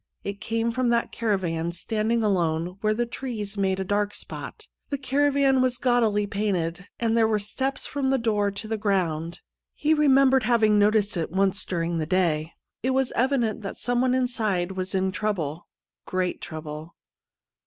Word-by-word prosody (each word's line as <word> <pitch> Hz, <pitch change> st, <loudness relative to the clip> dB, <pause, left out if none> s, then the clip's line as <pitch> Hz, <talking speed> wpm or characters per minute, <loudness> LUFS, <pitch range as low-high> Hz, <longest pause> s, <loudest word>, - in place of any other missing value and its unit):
It 200 Hz, +1 st, -5 dB
came 230 Hz, +1 st, -1 dB
from 250 Hz, +1 st, 0 dB
that 235 Hz, 0 st, +1 dB
caravan 175 Hz, -7 st, -1 dB
standing 220 Hz, +5 st, -1 dB
alone 175 Hz, -3 st, 0 dB
where 215 Hz, 0 st, +2 dB
the 240 Hz, +2 st, 0 dB
trees 230 Hz, -4 st, -5 dB
made 190 Hz, -1 st, 0 dB
a -, -, 0 dB
dark 205 Hz, +2 st, -1 dB
spot. -, -, -7 dB, 0.2 s
The 280 Hz, -, -1 dB
caravan 275 Hz, 0 st, +2 dB
was 255 Hz, -1 st, +2 dB
gaudily 230 Hz, -5 st, +2 dB
painted, 190 Hz, -3 st, -2 dB
and 230 Hz, -1 st, +1 dB
there 225 Hz, -1 st, +4 dB
were 220 Hz, -1 st, +2 dB
steps 260 Hz, +7 st, -2 dB
from 280 Hz, -2 st, -1 dB
the 270 Hz, -, +3 dB
door 210 Hz, -4 st, +1 dB
to 200 Hz, +2 st, -6 dB
the 220 Hz, 0 st, -2 dB
ground. 175 Hz, -5 st, -1 dB, 0.3 s
He 305 Hz, +1 st, +2 dB
remembered 270 Hz, -3 st, +5 dB
having 215 Hz, -3 st, +3 dB
noticed 205 Hz, -1 st, +3 dB
it 165 Hz, -, -1 dB
once 195 Hz, +2 st, +1 dB
during 170 Hz, -1 st, -1 dB
the 155 Hz, -, -2 dB
day. 165 Hz, -3 st, +1 dB, 0.3 s
It 260 Hz, +1 st, 0 dB
was 265 Hz, -1 st, +1 dB
evident 240 Hz, -4 st, +1 dB
that 195 Hz, -, -6 dB
someone 245 Hz, +1 st, +1 dB
inside 215 Hz, -8 st, 0 dB
was 190 Hz, 0 st, -4 dB
in 190 Hz, 0 st, +1 dB
trouble 175 Hz, -7 st, -3 dB, 0.2 s
— -, -, -67 dB
great 185 Hz, -1 st, -1 dB
trouble. 155 Hz, 0 st, -7 dB
210 Hz, 170 wpm, -25 LUFS, 185-240 Hz, 0.3 s, remembered